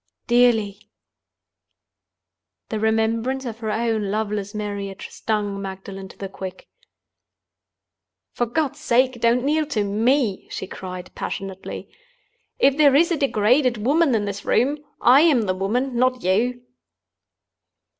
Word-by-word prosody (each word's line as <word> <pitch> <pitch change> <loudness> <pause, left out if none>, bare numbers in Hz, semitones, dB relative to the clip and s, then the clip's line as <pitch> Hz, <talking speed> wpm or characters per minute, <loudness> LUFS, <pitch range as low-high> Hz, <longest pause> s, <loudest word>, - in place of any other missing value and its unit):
"Dearly." 220 -4 +2 1.8
The 220 - -2
remembrance 225 +4 0
of 225 -2 -6
her 220 -1 -3
own 220 -2 0
loveless 210 -1 -2
marriage 200 -2 -5
stung 205 -2 -2
Magdalen 195 0 -7
to - - -16
the 195 - -5
quick. 190 -1 -8 1.6
"For 240 - -1
God's 280 +3 -1
sake, 250 0 +1
don't 235 +1 +3
kneel 305 +2 +1
to 215 -7 0
me!" 220 +1 +1
she - - -5
cried, 185 -1 -8
passionately. 195 -1 -6 0.7
"If 275 +1 +3
there 285 -3 +5
is 335 +4 +4
a - - +3
degraded 250 -1 +2
woman 290 -1 +3
in 210 -2 0
this 200 0 -5
room, 285 +5 +1 0.2
I 260 +4 +7
am 300 -8 +4
the 185 -3 0
woman—not 250 +6 0
you!" 240 +7 +1
225 Hz, 125 wpm, -22 LUFS, 200-255 Hz, 1.8 s, I